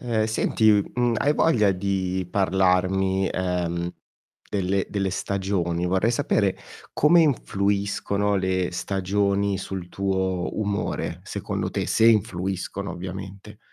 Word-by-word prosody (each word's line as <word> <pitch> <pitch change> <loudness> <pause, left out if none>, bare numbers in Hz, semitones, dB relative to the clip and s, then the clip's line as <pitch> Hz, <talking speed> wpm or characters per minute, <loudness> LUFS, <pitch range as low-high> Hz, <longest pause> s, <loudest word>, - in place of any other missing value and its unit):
Ehm, 115 -3 0
senti, 110 0 +2 0.2
mhmm, 120 -1 +1
hai 145 - +2
voglia 110 -11 +3
di 95 -1 -2
parlarmi, 95 0 +2
ehm, 90 -1 -2 0.6
delle 95 -1 0
delle 100 -2 -1
stagioni? 95 -3 -1
Vorrei 95 +5 +2
sapere 100 -4 +1 0.4
come 170 +4 +5
influiscono 100 -5 0
le 95 -1 0
stagioni 100 +1 0
sul 95 -2 -6
tuo 95 -1 -2
umore, 105 -2 -2
secondo - - -3
te, - - -2
se 115 - +3
influiscono 95 -2 0
ovviamente. 95 +2 -8
95 Hz, 110 wpm, -24 LUFS, 95-100 Hz, 0.6 s, come